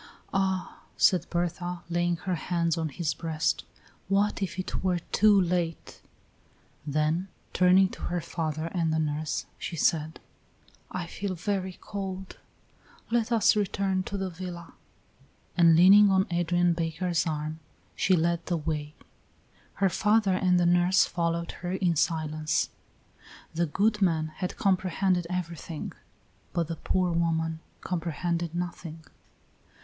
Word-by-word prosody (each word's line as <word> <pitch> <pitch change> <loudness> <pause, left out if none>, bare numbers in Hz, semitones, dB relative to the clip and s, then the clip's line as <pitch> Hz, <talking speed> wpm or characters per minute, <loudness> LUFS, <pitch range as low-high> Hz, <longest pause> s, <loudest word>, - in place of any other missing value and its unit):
"Ah," 190 -1 -1 0.2
said 185 - +4
Berta, 175 0 -2
laying 175 0 +1
her 180 +2 -3
hands 170 0 0
on 160 -2 -2
his 155 +2 -2
breast, 160 -1 -1 0.4
"what 200 +2 +1
if 190 -2 -3
it 185 - -4
were 185 -2 +2
too 205 +4 +4
late!" 175 -2 -2 0.9
Then, 155 +5 0 0.3
turning 185 +1 +5
to - - -11
her 175 0 -2
father 160 -1 -3
and 165 -3 +1
the 160 - +1
nurse, 155 -1 -1
she - - -4
said: 160 0 +1 0.7
"I 180 -1 -4
feel 185 +2 -4
very 185 +1 -2
cold; 190 -2 -6 0.7
let 235 0 +1
us 225 -2 +4
return 195 -2 0
to 200 - -4
the 190 -1 -3
villa;" 175 -1 -8 0.8
and 170 -2 +6
leaning 200 +4 +8
on 190 0 +3
Adrian 175 0 +2
Baker's 165 +1 -1
arm, 155 0 -3 0.4
she 190 - +3
led 170 0 +1
the 175 - 0
way. 150 -1 -3 0.8
Her 195 -1 +2
father 210 +1 +2
and 185 -1 +3
the 175 - +3
nurse 175 +2 +4
followed 170 0 -2
her 175 +1 -3
in 180 -3 +1
silence. 155 -1 0 0.8
The 170 +1 0
good 210 +6 +1
man 160 -4 +2
had 180 -2 -4
comprehended 185 -2 +1
everything, 170 -3 -4 0.6
but 170 -2 -1
the 165 - -2
poor 185 +2 0
woman 165 -1 0 0.2
comprehended 170 -1 -2
nothing. 170 -2 -5
175 Hz, 135 wpm, -28 LUFS, 165-185 Hz, 0.9 s, leaning